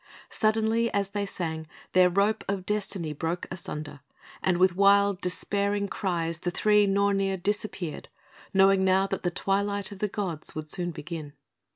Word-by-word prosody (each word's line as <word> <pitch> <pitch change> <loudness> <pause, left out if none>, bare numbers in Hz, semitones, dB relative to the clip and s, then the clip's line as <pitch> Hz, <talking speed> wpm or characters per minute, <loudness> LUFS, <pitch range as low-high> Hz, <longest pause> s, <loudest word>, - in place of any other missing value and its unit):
Suddenly, 220 +1 +1
as 200 -1 +1
they 205 -1 -2
sang, 160 -4 -4 0.3
their 185 -1 +6
rope 200 +4 +1
of 195 -2 -2
Destiny 195 -6 -2
broke 165 +4 -3
asunder; 150 -5 -6 0.4
and 185 -2 +2
with 185 0 +4
wild, 200 0 +4
despairing 200 +3 -1
cries 170 -5 -2
the 175 - -2
three 210 +3 +3
Nornir 195 -1 +2
disappeared, 190 -4 -3 0.4
knowing 195 0 +5
now 190 +1 +4
that 195 - -3
the 175 - 0
Twilight 200 +2 -1
of 200 - -9
the 210 - +1
Gods 185 -7 -4
would 155 0 -5
soon 175 -2 -1
begin. 155 -2 -7
195 Hz, 155 wpm, -27 LUFS, 175-200 Hz, 0.4 s, their